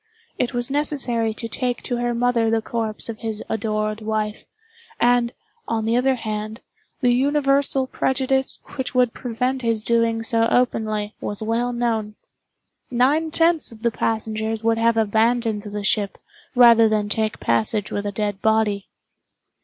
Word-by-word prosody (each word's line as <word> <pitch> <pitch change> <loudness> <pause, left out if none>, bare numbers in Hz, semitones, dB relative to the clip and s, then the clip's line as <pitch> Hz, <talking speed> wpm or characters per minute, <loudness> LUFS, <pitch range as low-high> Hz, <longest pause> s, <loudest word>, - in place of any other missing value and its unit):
It 245 0 -1
was 240 +2 -1
necessary 265 -6 0
to 230 - -5
take 245 +1 -2
to 245 - -2
her 240 0 -1
mother 235 -1 +2
the 225 0 +2
corpse 225 -2 -3
of 225 -2 -6
his 220 -2 -4
adored 215 0 -2
wife, 215 -1 -2 0.5
and, 240 0 +3 0.4
on 225 -1 -1
the 225 +1 +1
other 260 +2 +3
hand, 215 -1 -5 0.4
the 245 -2 +4
universal 275 0 +2
prejudice 265 0 0 0.2
which 260 -1 -4
would 250 -2 +3
prevent 250 +2 -2
his 230 -3 0
doing 230 -1 +1
so 225 -1 +2
openly 215 -4 0
was 205 +1 -4
well 230 +3 0
known. 225 -3 -1 0.7
Nine 275 +6 +2
tenths 330 -1 +2
of 225 0 -12
the 235 - +2
passengers 220 0 -2
would 225 0 +2
have 230 0 +3
abandoned 225 0 +1
the 205 0 -6
ship 200 0 0 0.4
rather 235 -2 +7
than 210 -1 0
take 215 +1 -1
passage 115 - 0
with 205 0 -2
a - - -2
dead 205 -1 -3
body. 220 -2 +1
230 Hz, 155 wpm, -22 LUFS, 215-245 Hz, 0.7 s, rather